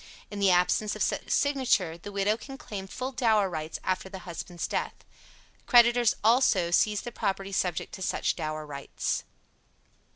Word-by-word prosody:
In 205 Hz, -, -5 dB
the 200 Hz, -1 st, +4 dB
absence 180 Hz, +4 st, +2 dB
of -, -, 0 dB
such -, -, -2 dB
signature, 255 Hz, -, +2 dB
the 170 Hz, +4 st, -9 dB
widow 200 Hz, +1 st, +1 dB
can 270 Hz, +4 st, -10 dB
claim 205 Hz, -9 st, -7 dB
full 255 Hz, +6 st, -4 dB
dower 225 Hz, -6 st, +2 dB
rights 155 Hz, -1 st, -4 dB
after 185 Hz, 0 st, -2 dB
the 190 Hz, -1 st, -9 dB
husband's 175 Hz, 0 st, -5 dB
death. -, -, -2 dB, 0.7 s
Creditors, 240 Hz, -1 st, +5 dB
also, 220 Hz, -7 st, +4 dB
seize 210 Hz, +3 st, +3 dB
the 240 Hz, -, -7 dB
property 195 Hz, -3 st, -2 dB
subject 180 Hz, -3 st, -1 dB
to -, -, -8 dB
such -, -, 0 dB
dower 155 Hz, 0 st, -4 dB
rights. 140 Hz, -2 st, -3 dB
195 Hz, 160 wpm, -28 LUFS, 180-235 Hz, 0.7 s, Creditors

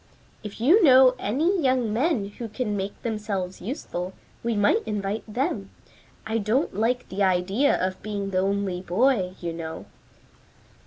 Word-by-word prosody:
"If 210 Hz, -1 st, -8 dB
you 335 Hz, -, +5 dB
know 260 Hz, -3 st, +7 dB
any 325 Hz, -, +1 dB
young 255 Hz, -5 st, +1 dB
men 240 Hz, -5 st, +1 dB
who 235 Hz, -2 st, -4 dB
can 215 Hz, -1 st, -2 dB
make 195 Hz, 0 st, -4 dB
themselves 205 Hz, -5 st, -3 dB
useful, 185 Hz, -, -5 dB, 0.3 s
we 230 Hz, -1 st, -1 dB
might 205 Hz, +2 st, +3 dB
invite 210 Hz, +1 st, -3 dB
them. 210 Hz, -, -2 dB, 0.6 s
I 220 Hz, +1 st, -1 dB
don't 225 Hz, +8 st, 0 dB
like 235 Hz, +5 st, 0 dB
the 195 Hz, +2 st, -4 dB
idea 190 Hz, +8 st, +2 dB
of 185 Hz, 0 st, -2 dB
being 200 Hz, -2 st, -4 dB
the 185 Hz, -, +1 dB
only 195 Hz, -1 st, -1 dB
boy, 190 Hz, 0 st, +1 dB
you 170 Hz, -1 st, -4 dB
know." 160 Hz, -1 st, -6 dB
210 Hz, 150 wpm, -25 LUFS, 190-250 Hz, 0.6 s, know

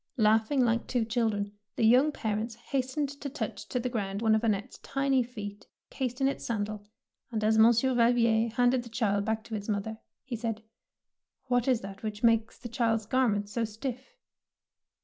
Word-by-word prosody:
Laughing 220 Hz, +4 st, +3 dB
like 230 Hz, 0 st, 0 dB
two 245 Hz, -3 st, 0 dB
children, 220 Hz, -3 st, 0 dB, 0.2 s
the 225 Hz, -, +2 dB
young 255 Hz, +7 st, +5 dB
parents 220 Hz, -2 st, -3 dB
hastened 270 Hz, +4 st, -2 dB
to 280 Hz, +1 st, -7 dB
touch 275 Hz, -, -5 dB
to 250 Hz, -, -1 dB
the 250 Hz, -, -2 dB
ground 200 Hz, -5 st, -2 dB
one 220 Hz, 0 st, +3 dB
of 220 Hz, -, +3 dB
Annette^s 210 Hz, -3 st, -1 dB
tiny 275 Hz, -1 st, +1 dB
feet 210 Hz, -4 st, -7 dB, 0.2 s
cased 255 Hz, -1 st, -3 dB
in 270 Hz, -, +3 dB
its 275 Hz, -, -2 dB
sandal, 210 Hz, -2 st, -2 dB, 0.5 s
and 220 Hz, -2 st, -2 dB
as 220 Hz, +1 st, +3 dB
Monsieur 235 Hz, +3 st, +5 dB
Valvier 235 Hz, -1 st, +3 dB
handed 245 Hz, +1 st, +3 dB
the 235 Hz, -, -11 dB
child 205 Hz, -3 st, 0 dB
back 220 Hz, 0 st, -1 dB
to 225 Hz, -, -10 dB
its 205 Hz, 0 st, -4 dB
mother, 215 Hz, +2 st, -2 dB, 0.2 s
he 255 Hz, -, -5 dB
said, 225 Hz, -1 st, -3 dB, 0.4 s
— -, -, -55 dB
What 245 Hz, 0 st, +2 dB
is 255 Hz, -4 st, +3 dB
that 195 Hz, 0 st, -9 dB
which 215 Hz, 0 st, -5 dB
makes 230 Hz, -1 st, +3 dB
the 240 Hz, -, -7 dB
child's 225 Hz, -2 st, 0 dB
garments 210 Hz, -4 st, +1 dB
so 235 Hz, +2 st, -1 dB
stiff? 250 Hz, +4 st, -5 dB
230 Hz, 185 wpm, -29 LUFS, 215-250 Hz, 0.5 s, young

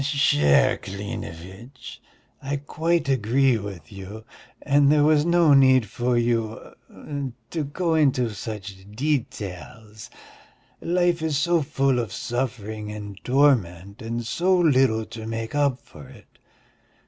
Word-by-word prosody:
"Cher 135 Hz, -, +3 dB
Klinevitch, 100 Hz, +4 st, -8 dB, 0.4 s
I 140 Hz, +2 st, -3 dB
quite 160 Hz, +4 st, -1 dB
agree 130 Hz, 0 st, +2 dB
with 95 Hz, -7 st, -9 dB
you, 100 Hz, +3 st, -9 dB, 0.4 s
and 145 Hz, 0 st, +4 dB
there 150 Hz, -1 st, +4 dB
was 150 Hz, +1 st, +3 dB
no 170 Hz, -3 st, +4 dB
need 130 Hz, -3 st, +5 dB
for 120 Hz, +4 st, -1 dB
you... 115 Hz, -2 st, -2 dB, 0.8 s
to 160 Hz, -3 st, -2 dB
go 165 Hz, +4 st, -2 dB
into 135 Hz, -6 st, +2 dB
such 105 Hz, -1 st, -7 dB, 0.2 s
details. 110 Hz, -5 st, -4 dB, 0.7 s
Life 175 Hz, -1 st, +1 dB
is 160 Hz, -3 st, 0 dB
so 170 Hz, +2 st, +2 dB
full 135 Hz, -3 st, 0 dB
of 115 Hz, -5 st, -3 dB
suffering 110 Hz, -2 st, -4 dB
and 105 Hz, -2 st, -9 dB
torment 105 Hz, -, +1 dB
and 115 Hz, +1 st, -4 dB
so 180 Hz, +10 st, +1 dB
little 130 Hz, -9 st, +3 dB
to 110 Hz, 0 st, -9 dB
make 115 Hz, +1 st, -5 dB
up 140 Hz, -3 st, +1 dB
for 70 Hz, -3 st, -14 dB
it -, -, -18 dB
120 Hz, 125 wpm, -24 LUFS, 105-145 Hz, 0.8 s, need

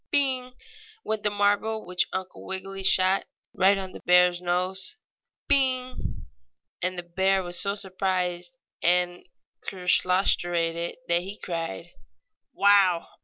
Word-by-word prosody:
"Bing!" 260 Hz, -5 st, +1 dB, 0.5 s
went 220 Hz, -1 st, -2 dB
the 210 Hz, -, +1 dB
marble 205 Hz, +2 st, 0 dB
which 180 Hz, 0 st, 0 dB
Uncle 190 Hz, 0 st, -6 dB
Wiggily 195 Hz, +1 st, -5 dB
shot, 190 Hz, 0 st, +2 dB, 0.3 s
right 195 Hz, +2 st, +4 dB
on 190 Hz, -1 st, -5 dB
the -, -, -10 dB
bear's 180 Hz, 0 st, +4 dB
nose. 185 Hz, -, -2 dB, 0.5 s
"Bing!" 255 Hz, -2 st, +1 dB, 0.6 s
And 185 Hz, +1 st, -1 dB
the 175 Hz, -, -4 dB
bear 190 Hz, +2 st, +1 dB
was 175 Hz, 0 st, -2 dB
so 200 Hz, 0 st, 0 dB
surprised 180 Hz, -3 st, -3 dB, 0.2 s
and 175 Hz, +1 st, +1 dB, 0.4 s
kerslostrated 175 Hz, -2 st, +1 dB
that 170 Hz, 0 st, +2 dB
he 195 Hz, +3 st, -7 dB
cried: 165 Hz, -, -5 dB, 0.6 s
"Wow! 195 Hz, -4 st, +4 dB
185 Hz, 120 wpm, -26 LUFS, 175-200 Hz, 0.6 s, right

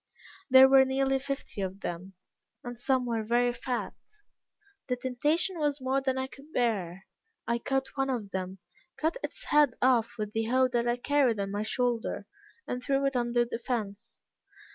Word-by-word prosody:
There 260 Hz, 0 st, +9 dB
were 265 Hz, 0 st, +7 dB
nearly 270 Hz, 0 st, +1 dB
fifty 275 Hz, -6 st, -5 dB
of 190 Hz, +1 st, -4 dB
them, 180 Hz, +3 st, -6 dB, 0.5 s
and 245 Hz, 0 st, -6 dB
some 255 Hz, +1 st, 0 dB
were 230 Hz, -2 st, -1 dB
very 240 Hz, +2 st, +2 dB
fat. 245 Hz, 0 st, -3 dB, 0.9 s
The 250 Hz, -, 0 dB
temptation 300 Hz, -, 0 dB
was 295 Hz, -1 st, 0 dB
more 265 Hz, +1 st, 0 dB
than 265 Hz, -1 st, -1 dB
I 260 Hz, -, -1 dB
could 275 Hz, +3 st, -14 dB
bear. 195 Hz, -, -1 dB, 0.4 s
I 235 Hz, +1 st, +1 dB
caught 270 Hz, +2 st, -1 dB
one 270 Hz, -1 st, 0 dB
of 225 Hz, -6 st, -3 dB
them, 190 Hz, 0 st, -4 dB, 0.4 s
cut 320 Hz, +8 st, 0 dB
its -, -, -5 dB
head 295 Hz, -5 st, +3 dB
off 240 Hz, -3 st, +2 dB
with 210 Hz, -1 st, -4 dB
the 225 Hz, 0 st, 0 dB
hoe 255 Hz, +3 st, +3 dB
that 240 Hz, -1 st, 0 dB
I 240 Hz, 0 st, +1 dB
carried 255 Hz, -4 st, +2 dB
on 195 Hz, 0 st, -2 dB
my 205 Hz, +1 st, -2 dB
shoulder, 235 Hz, -2 st, -1 dB, 0.4 s
and 250 Hz, 0 st, -4 dB
threw 275 Hz, +1 st, +1 dB
it 275 Hz, -1 st, 0 dB
under 240 Hz, 0 st, +1 dB
the 235 Hz, -1 st, -5 dB
fence. 225 Hz, -3 st, -5 dB
245 Hz, 175 wpm, -29 LUFS, 225-270 Hz, 0.9 s, There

